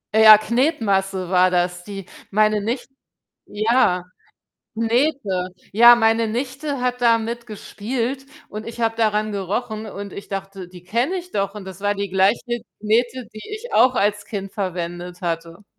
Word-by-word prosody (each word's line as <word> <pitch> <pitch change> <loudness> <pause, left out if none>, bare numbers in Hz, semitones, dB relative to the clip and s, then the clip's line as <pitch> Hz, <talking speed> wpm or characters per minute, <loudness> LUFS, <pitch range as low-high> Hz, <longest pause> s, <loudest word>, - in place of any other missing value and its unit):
Ja, 215 -1 +10
Knetmasse 205 - 0
war 185 0 +5
das, 180 0 0
die 195 -2 -8 0.2
meine 215 0 +2
Nich 235 +5 -2 0.6
ja. 215 -4 +2 0.7
Knete. 230 -5 0 0.2
Ja, 235 +3 +8
meine 225 0 +2
Nichte 265 +4 -3
hat 250 0 -1
damit 235 0 +1
gespielt 240 +4 -4 0.2
und 215 +1 -7
ich 235 +1 -7
habe 225 0 +1
daran 215 -1 +1
gerochen 210 +3 -3
und 200 -2 -7
ich 200 - -9
dachte: 195 -2 -6
„Die 180 -1 -14
kenne 240 - 0
ich 360 0 -8
doch“ 200 0 -1
und 200 -2 -8
das 190 0 -10
war 205 0 +1
die 200 -1 -4
gleiche 195 +4 +3 0.4
Knete, 235 +2 0
die 215 - -10
ich 435 +3 -7
auch 255 0 +5
als 205 0 +1
Kind 195 -3 -5
verwendet 180 -3 -4
hatte. 170 +3 -4
215 Hz, 150 wpm, -21 LUFS, 195-235 Hz, 0.7 s, Ja